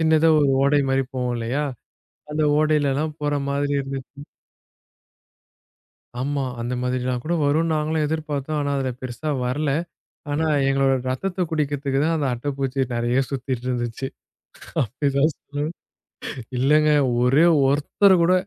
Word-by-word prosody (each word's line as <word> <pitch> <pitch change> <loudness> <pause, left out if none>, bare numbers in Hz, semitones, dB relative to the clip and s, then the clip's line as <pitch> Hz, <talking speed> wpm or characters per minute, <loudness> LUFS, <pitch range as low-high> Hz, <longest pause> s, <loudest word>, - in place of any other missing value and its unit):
சின்னதாக 160 0 +4
ஒரு 140 - +3
ஓடை 140 +1 +4
மாதிரி 135 0 +2
போகும் 125 -1 -1
இல்லையா? 125 +6 -1 0.7
அந்த 155 +1 0 0.2
ஓடையில் 150 -2 +2
எல்லாம் 155 +2 -2
போகிற 145 0 0 0.2
மாதிரி 145 0 0
இருந்தது. 135 -1 -5 2.2
ஆமாம் 135 -2 -2
அந்த 120 +2 -3
மாதிரி 125 0 -1
எல்லாம் 125 -1 -2
கூட 170 - 0
வரும் 150 +3 +2
என்று 165 -1 0
நாங்களும் 155 0 0
எதிர்பார்த்தோம், 150 -1 -2
ஆனால் 145 0 -1
அதில் 125 -2 -4
பெரிசா 130 +5 -4 0.2
வரலை. 140 +3 0 0.5
ஆனால் 150 -1 +1
எங்களுடைய 135 -1 +2
இரத்தத்தைக் 180 +6 -2
குடிப்பதற்குத் 145 -2 0
தான் 165 - +1
அந்த 145 - 0
அட்டைப்பூச்சி 135 +1 -2
நிறைய 120 +2 +1
சுத்திக்கொண்டு 130 -2 -3
இருந்தது. 120 +1 -2 0.8
அப்படித் 135 +4 -1
தான் 150 +3 +4
சொல்ணும் 145 +2 -4 0.9
இல்லைங்க. 150 +4 +4 0.3
ஒரே 135 +7 +5 0.2
ஒருத்தர் 150 +7 +4
கூட 180 - +4
140 Hz, 135 wpm, -23 LUFS, 130-155 Hz, 2.2 s, ஒரே